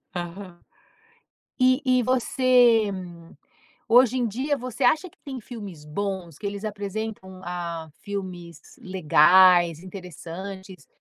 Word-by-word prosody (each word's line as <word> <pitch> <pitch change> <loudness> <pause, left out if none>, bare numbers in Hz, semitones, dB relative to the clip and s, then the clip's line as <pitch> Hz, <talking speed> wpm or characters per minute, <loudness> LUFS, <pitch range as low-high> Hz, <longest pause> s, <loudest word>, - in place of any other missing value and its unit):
Aham. 175 0 -7 1.0
E 255 +1 +3
e 255 -1 +3
você, 250 -2 +3 1.0
hoje 250 +1 +5
em 245 -2 +1
dia, 270 +7 -1
você 250 +1 -5
acha 315 +8 +2
que - - -30
tem 265 -3 -6
filmes 205 -10 -9
bons, 180 0 -4
que 205 - -5
eles 200 +1 -5
apresentam, 205 -2 -5
ah, 170 -2 -5
filmes 180 -5 -6 0.2
legais, 175 -1 +5
interessantes, 185 +1 -9
200 Hz, 110 wpm, -24 LUFS, 175-245 Hz, 1.0 s, hoje